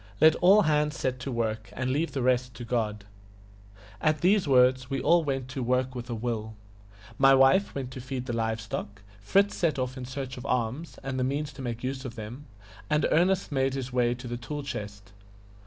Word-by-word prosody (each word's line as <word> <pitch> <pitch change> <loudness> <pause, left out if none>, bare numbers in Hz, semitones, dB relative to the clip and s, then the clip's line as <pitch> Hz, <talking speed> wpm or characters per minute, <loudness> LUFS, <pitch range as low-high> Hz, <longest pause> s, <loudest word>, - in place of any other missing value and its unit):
Let 155 +1 +7
all 200 +4 +6
hands 150 -2 +1
set 130 -1 -2
to 135 +2 -5
work, 110 -2 -2
and 130 0 -2
leave 155 +5 -1
the 135 - -1
rest 125 -1 +1
to 120 - -7
God." 105 -4 -2 1.0
At 155 -1 +1
these 190 -1 +3
words 130 -1 +4
we 135 -1 -1
all 170 +6 +4
went 135 -3 -2
to 130 0 -4
work 125 +1 0
with 120 -1 -7
a 120 - -2
will. 110 -1 -3 0.6
My 135 0 +7
wife 135 +10 +4
went 130 -2 -4
to 130 - -7
feed 130 0 -5
the 120 - -3
live 115 -1 -1
stock; 100 -1 -6 0.2
Fritz 195 - +2
set 165 -5 0
off 130 0 -3
in 125 - -5
search 130 0 -6
of 125 - -8
arms, 125 +6 -2
and 130 -1 -3
the - - +1
means 145 +3 -2
to 135 - -9
make 120 -2 -4
use 130 +1 -3
of 125 -3 -7
them; 120 +6 -8 0.4
and 150 0 +2
Ernest 180 +2 +2
made 135 -1 +1
his 130 -2 -5
way 120 -1 +2
to 125 +1 -9
the 120 0 -4
tool 145 +4 -5
chest. 105 -7 -7
130 Hz, 210 wpm, -28 LUFS, 120-140 Hz, 1.0 s, Let